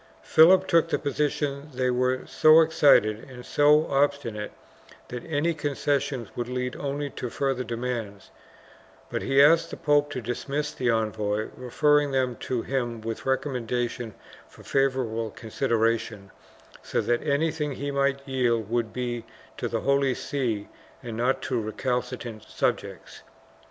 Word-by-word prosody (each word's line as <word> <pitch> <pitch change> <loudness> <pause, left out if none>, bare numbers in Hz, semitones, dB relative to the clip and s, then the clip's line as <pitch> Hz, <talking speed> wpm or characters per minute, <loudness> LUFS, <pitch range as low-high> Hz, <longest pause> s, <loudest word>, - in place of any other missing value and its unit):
Philip 185 +4 +6
took 165 -2 +3
the - - +1
position 145 0 -2
that 130 - -16
they 125 -1 +1
were 125 +1 0
so 155 +1 +6
excited 145 -9 +4
and 125 -1 -10
so 150 +2 +4
obstinate 135 -7 0 0.6
that 125 -1 -6
anj^ 160 +2 0
concessions 140 -4 -1
would 120 -1 -3
lead 125 0 -3
only 145 0 -3
to 125 - -5
further 135 +1 -1
demands, 115 -4 -5 0.8
but - - -2
he 135 +1 +4
asked 165 +3 +5
the - - -7
pope 145 -1 +2
to 145 - -4
dismiss 140 +5 -3
the 125 - -1
envoys, 110 -1 -1
referring 145 +4 +2
them 130 -2 0
to 125 -3 -3
him 120 -4 -2
with 115 +3 -5
recommendation 125 -4 -2 0.3
for - - -16
favor 135 -1 +1
able 115 -1 -3
consideration, 115 -2 -1 0.5
so - - -2
that 120 0 +1
anything 150 +1 0
that 140 - -5
he 140 +2 -3
might 140 0 0
yield 120 -5 0
would 120 -2 0
be 120 -2 -3 0.3
to - - -2
the - - -2
Holy 140 -2 +2
See 115 -7 -2 0.4
and 115 -2 -6
not 125 +4 0
to 125 -3 -1
recalcitrant 125 0 -3
subjects. - - -3
130 Hz, 145 wpm, -26 LUFS, 115-145 Hz, 0.8 s, Philip